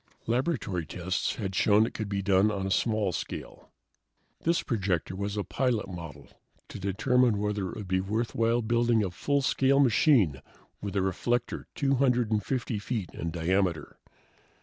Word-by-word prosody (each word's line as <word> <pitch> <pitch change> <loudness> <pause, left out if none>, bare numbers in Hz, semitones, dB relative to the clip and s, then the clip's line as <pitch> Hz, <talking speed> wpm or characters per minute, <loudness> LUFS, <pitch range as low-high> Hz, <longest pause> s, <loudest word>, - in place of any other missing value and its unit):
Laboratory 115 - -1
tests 90 +3 -2
had 95 -4 -4
shown 105 +3 +4
it - - -5
could 110 -2 -4
be 100 -1 -2
done 95 +1 +4
on 100 -2 -2
a 95 - -2
small 110 -2 +1
scale. 80 - -6 0.7
This 170 +1 +1
projector 95 - -1
was 100 +1 -3
a 105 - 0
pilot 125 -3 -1
model 85 -5 -8 0.4
to - - -8
determine 115 +4 +2
whether 105 -2 -1
it - - -7
would 105 -3 -7
be 95 0 +1
worthwhile 115 +3 0
building 120 0 +2
a 95 - -2
full 140 +10 0
size - - -1 0.2
machine 115 - +4 0.4
with 100 -1 -5
a 100 - +2
reflector 120 +6 -1
250 125 -4 +1
feet 105 -4 -4
in 85 - -4
diameter. 85 0 -1
105 Hz, 150 wpm, -28 LUFS, 95-120 Hz, 0.7 s, shown